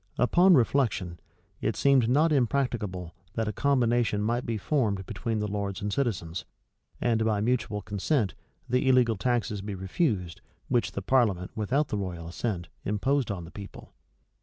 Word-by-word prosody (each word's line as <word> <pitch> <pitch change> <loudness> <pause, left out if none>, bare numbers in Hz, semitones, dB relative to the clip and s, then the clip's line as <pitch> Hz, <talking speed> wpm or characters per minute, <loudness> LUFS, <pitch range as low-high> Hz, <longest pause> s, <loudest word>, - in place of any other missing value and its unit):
Upon 175 +8 +5
reflection, 115 - +1 0.4
it - - 0
seemed 135 -4 +4
not 155 +5 +4
impracticable 115 - 0 0.2
that 110 -1 -1
a 105 - -2
combination 120 -6 +2
might 120 +3 -1
be 115 -1 -1
formed 105 -5 0
between 110 +3 -3
the 105 0 -1
lords 100 -1 -3
and 105 -2 -3
citizens; 95 -11 -2 0.6
and, 115 -2 +1
by 110 -2 +1
mutual 110 -2 0
concert, 105 +2 0 0.3
the 125 +2 +2
illegal 125 -3 +4
taxes 110 -2 -1
be 100 0 -5
refused, 95 - -1 0.3
which 120 -2 +1
the 100 - -4
parliament, 105 -8 +2
without 130 +8 0
the 105 - -1
royal 85 -4 -5
assent, 90 0 -3 0.2
imposed 130 +6 0
on 90 -4 -4
the 85 - -12
people. 100 0 -10
110 Hz, 155 wpm, -28 LUFS, 100-125 Hz, 0.6 s, Upon